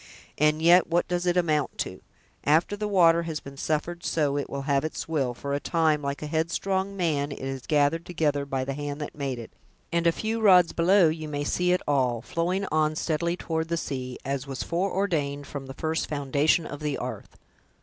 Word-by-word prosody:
And 150 +1 +3
yet 175 +1 +6
what 175 +1 +1
does 175 0 -1
it 175 0 +2
amount 155 -5 +1
to! - - -4 0.4
After 160 +7 +3
the 210 +1 -3
water 170 -4 +5
has 165 -2 -4
been 140 0 -11
suffered 160 +5 -2
so 145 -3 +1
to 140 - -5
have 140 0 +1
its 155 - -4
will, 135 -7 -1
for 140 +3 -4
a 140 - 0
time, 155 -2 +1
like 140 +1 -3
a - - -3
headstrong 190 +5 -1
man, 150 -5 0
it - - -6
is 135 -1 -5
gathered 150 +2 +2
together 155 -5 0
by 135 -1 -2
the 135 - -3
hand 145 +1 -5
that 150 - -5
made 135 -3 -3
it, 115 -2 -9 0.4
and 170 0 +2
a - - +6
few 220 +6 -2
rods 180 -5 +6
below 180 +1 +5
you 155 0 -4
may 145 -1 -3
see 180 +4 +1
it 180 - +1
all, 130 -5 +2
flowing 180 +5 -1
on 155 0 +2
steadily 170 +2 -1
toward 160 -2 -2
the 170 0 -1
sea, 130 -5 -4
as 140 0 -2
was 135 -2 -4
foreordained 170 -6 -1
from 135 -1 -7
the 135 - -8
first 160 +2 -1
foundation 145 +3 +1
of 145 - -7
the 150 -2 -2
'arth!" - - -7
155 Hz, 205 wpm, -26 LUFS, 140-170 Hz, 0.4 s, yet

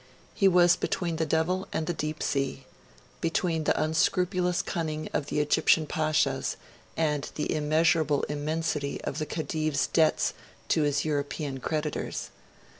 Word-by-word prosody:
He 195 - +3
was 175 -1 +6
between 170 -2 -2
the 160 0 0
devil 170 +5 0
and 160 - -1
the 175 - -1
deep 155 -1 -3
sea 135 -1 -1 0.5
between 165 -1 0
the - - +2
unscrupulous 180 +3 +1
cunning 155 -3 -3
of 145 - -1
the - - -1
Egyptian 150 +2 +3
Pashas, 155 0 0 0.4
and 150 -3 0
the 150 - -1
immeasurable 155 -1 +2
immensity 150 -1 -2
of 140 - -3
the 155 - -2
Khedive's 155 -2 -1
debts 160 -2 +2 0.4
to 160 - +3
his 145 0 +1
European 145 -2 -2
creditors. 150 +1 -3
155 Hz, 135 wpm, -28 LUFS, 150-165 Hz, 0.5 s, was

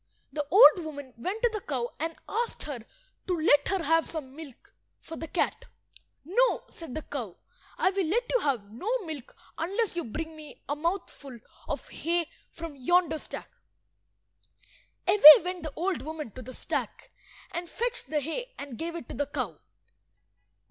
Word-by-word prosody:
The 295 -2 -2
old 385 -1 +8
woman 285 -4 -7
went 375 - -4
to 480 - +6
the 430 - -3
cow 250 -7 -3
and 325 +2 -2
asked 470 +1 -2
her 285 -5 -5 0.5
to 360 -2 +1
let 300 -2 +4
her 385 -3 0
have 325 0 +4
some 275 -5 -6
milk 295 -5 -12 0.3
for 325 - -9
the 325 - -6
cat. 340 - -1 0.6
"No," 485 +10 +2
said 325 -7 -8
the 310 - -4
cow; 235 -11 -6 0.4
"I - - +3
will 385 -3 0
let 455 +9 +2
you - - +4
have 240 - -1
no 245 - -5 0.2
milk 305 -6 -7 0.2
unless 395 +5 0
you 345 - -1
bring 315 +7 -5
me 305 -2 -11
a 290 - -1
mouthful 300 -5 -3 0.3
of - - -4
hay 340 +1 0 0.2
from 330 -3 -8
yonder 320 +3 +2
stack." - - -8 1.6
Away 310 -7 +11
went 360 0 -4
the 310 -2 -6
old 360 +1 -1
woman 310 -5 -6
to 255 - -9
the 255 +1 -9
stack - - -4 0.4
and 345 0 -4
fetched 480 - -2
the 300 +1 0
hay - - -5
and 275 -5 -8
gave 335 +1 -3
it 335 - -7
to - - -5
the 285 +3 -1
cow. 290 - -4
320 Hz, 170 wpm, -28 LUFS, 285-360 Hz, 1.6 s, Away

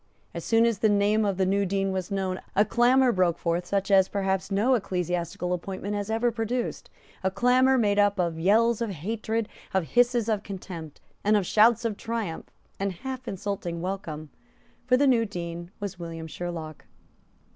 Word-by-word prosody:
As - - -5
soon 225 0 +3
as 230 -4 +1
the 220 - +3
name 205 +1 +3
of 195 -2 0
the 190 - +2
new 200 +2 +2
Dean 195 0 0
was 185 0 -3
known, 190 -2 -2
a 205 - +5
clamour 250 +2 +4
broke 180 -4 +2
forth 170 +1 -1
such 200 +1 -1
as 190 -1 +6
perhaps 195 -1 -1
no 210 +6 +2
ecclesiastical 180 -4 -1
appointment 190 +3 -4
has 205 0 -3
ever 225 +2 +1
produced, 230 +2 -3 0.3
a 190 - +2
clamour 255 +5 +3
made 205 -3 +2
up 205 0 +3
of 170 -2 0
yells 225 +6 +3
of 230 - -1
hatred, 220 +5 -3 0.3
of 180 -5 0
hisses 240 -2 +3
of 215 -3 0
contempt, 180 -6 -8 0.2
and 210 +1 +4
of 200 - 0
shouts 225 +4 +4
of 215 -3 -1
triumphant 225 -8 -4 0.3
and 195 -1 -1
half 255 +5 -7
insulting 190 -3 -4
welcome; 165 -5 -5 0.6
for 250 0 +5
the 285 - +3
new 245 -4 +4
Dean 170 -4 -6
was 200 -3 -5
William 165 -1 -6
Sherlock. 160 -2 -6
200 Hz, 180 wpm, -26 LUFS, 180-225 Hz, 0.6 s, as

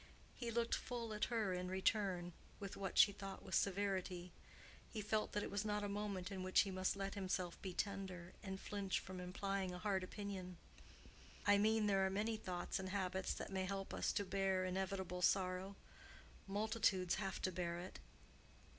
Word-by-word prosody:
He 235 - -3
looked 235 0 +1
full 235 -3 -2
at 210 0 +1
her 220 -5 +1
in 180 0 -2
return, 190 -2 +1 0.3
with 200 -2 -5
what 195 -2 -3
she 205 - +9
thought 195 -1 -7
was - - -2
severity. 185 -2 +1 0.6
He 220 - -4
felt 215 +1 0
that 205 - +1
it - - -4
was 200 +1 0
not 210 -1 0
a - - 0
moment 200 -2 -2
in 190 -1 -3
which 185 0 +5
he 195 - -1
must 185 +1 +1
let 195 0 -2
himself 185 -3 -1
be 190 - -3
tender, 185 -2 -3
and 190 -1 -4
flinch 200 -2 -1
from 185 -1 -7
implying 185 +1 -1
a - - -4
hard 190 0 +1
opinion. 185 -2 -5 0.9
"I 205 0 +7
mean 220 +1 +4
there 195 -2 +4
are 190 - +3
many 210 +4 +1
thoughts 185 -5 -2
and 190 0 -3
habits 190 -1 0
that - - -5
may 190 -1 +1
help 195 0 -3
us - - +1
to 200 - +1
bear 190 -1 +2
inevitable 190 -1 -1
sorrow. 185 +1 +2 0.7
Multitudes 205 -3 +2
have 195 -1 -2
to 185 - +2
bear 170 -1 -1
it." 180 +2 -7
195 Hz, 180 wpm, -41 LUFS, 185-205 Hz, 0.9 s, she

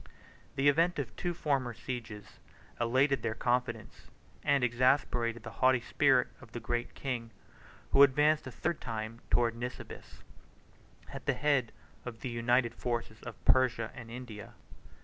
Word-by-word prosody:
The 135 +1 +2
event 165 +5 +3
of - - -2
the - - -26
two 175 -1 -3
former 135 -7 -1
sieges 115 -5 -7 0.4
elated 130 +4 +2
their 115 -1 -2
confidence, 120 -2 -2 0.3
and 140 -2 +3
exasperated 120 -2 +2
the 110 - -7
haughty 130 -1 +5
spirit 130 0 +3
of 115 - -15
the 120 - -4
Great 120 +2 -3
King, 120 -4 -3 0.6
who 140 - +6
advanced 150 +2 +5
a - - -6
third 160 +6 -2
time 115 0 -5
towards 120 -1 +2
Nisibis, 125 +1 -8 0.9
at - - -8
the - - +3
head 140 -6 +1 0.3
of 115 -2 -8
the 130 - -3
united 120 0 +1
forces 115 -3 -4
of - - -10
Persia 125 -3 +3
and 115 -3 -10
India. 115 -4 -9
125 Hz, 150 wpm, -31 LUFS, 115-135 Hz, 0.9 s, who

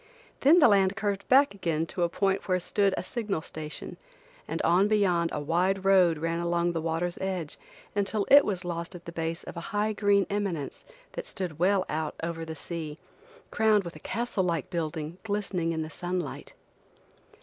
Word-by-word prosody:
Then 295 +6 +6
the 305 - +7
land 195 -2 +4
curved 200 -2 -2
back 275 0 +6
again 165 -5 -1
to 175 - -5
a 170 - +3
point 195 +3 0
where 185 -1 +2
stood 195 +2 +1
a - - -2
signal 210 -9 -3
station, 155 -1 -6 0.5
and - - -3
on 180 +4 +4
beyond 185 -6 +2
a - - -2
wide 180 +6 0
road 185 -4 +5
ran 165 +2 -1
along 170 0 +1
the 165 -1 -2
water's 165 +2 -2
edge 185 -5 -3 0.4
until 205 0 0
it 285 +1 +10
was 185 -3 -2
lost 170 +1 -4
at 175 - -11
the 170 - -6
base 165 0 -3
of - - -9
a 170 - -6
high 210 +1 +1
green 200 -1 +3
eminence 195 -8 -3 0.3
that - - -6
stood 175 -5 -5
well 190 +1 +3
out 155 0 -3
over 165 -1 -3
the 160 0 -6
sea, 155 -1 -6 0.5
crowned 215 -2 +3
with 170 -1 -8
a - - -10
castle 230 -4 -2
like 170 -4 -1
building 160 0 -3
glistening 200 -5 -1
in 160 -1 -2
the 155 - -8
sunlight. 175 -4 -4
180 Hz, 185 wpm, -28 LUFS, 165-200 Hz, 0.5 s, it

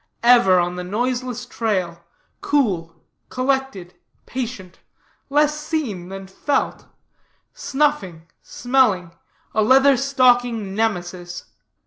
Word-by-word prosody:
Ever 235 -7 +6
on 175 +1 -1
the 180 - -4
noiseless 245 +4 -2
trail; 185 -8 -2 0.4
cool, 185 - 0 0.3
collected, 255 -8 -2 0.3
patient; 235 -8 -6 0.5
less 295 +1 +2
seen 265 - -4
than 195 0 -7
felt; 230 +9 -2 0.7
snuffing, 265 - -1 0.2
smelling 240 -9 +1 0.4
a 215 - +2
Leather 270 +5 +5
stocking 245 -6 +2
Nemesis. 180 -5 -3
225 Hz, 90 wpm, -21 LUFS, 185-265 Hz, 0.7 s, Ever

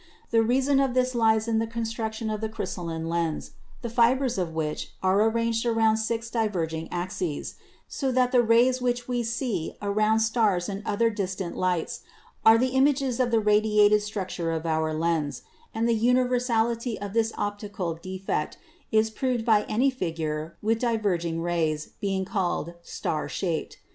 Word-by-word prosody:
The 225 -1 +4
reason 265 +4 +2
of 270 -2 +1
this 255 0 +2
lies 220 -2 +3
in 225 -1 +2
the 225 - -1
construction 225 -1 -3
of 215 0 -3
the 220 - -2
crystalline 175 -6 -4
lens, 165 -2 -2 0.3
the 235 - -3
fibers 245 0 +2
of 175 -3 -1
which 155 -1 -4
are 190 +2 +3
arranged 230 0 0
around 225 -2 +3
six 225 +1 -2
diverg 200 -8 -1
ing 160 0 -4
axes, 175 -3 -3 0.3
so 270 -2 -2
that 250 0 +2
the 250 -2 +5
rays 240 +2 +4
which 245 -1 -1
we 245 -1 0
see 235 -6 -2
around 215 +2 +2
stars 220 -6 +2
and 200 0 -4
other 230 +2 +2
distant 190 -3 -3
lights 180 -3 -1 0.4
are 220 0 +8
images 265 0 +2
of 250 -1 +2
the 230 -1 +3
radiated 210 0 +4
structure 190 -5 -3
of 160 0 -3
our 160 -1 0
lens; 155 -2 -1 0.3
and 225 +1 0
the 235 - +3
universality 240 -1 +1
of 200 -1 -6
this 225 0 +2
optical 205 -4 -3
defect 185 -2 -4 0.3
is 220 0 +3
proved 245 0 -1
by 215 -3 +4
any 255 +5 +2
figure 160 -7 -4
with 225 +1 +1
diverging 185 -9 0
rays, 160 -3 -1
being 195 -2 -1
called 180 -5 -2
'star 155 -2 -3
shaped.' 170 -4 -3
220 Hz, 160 wpm, -26 LUFS, 180-235 Hz, 0.4 s, are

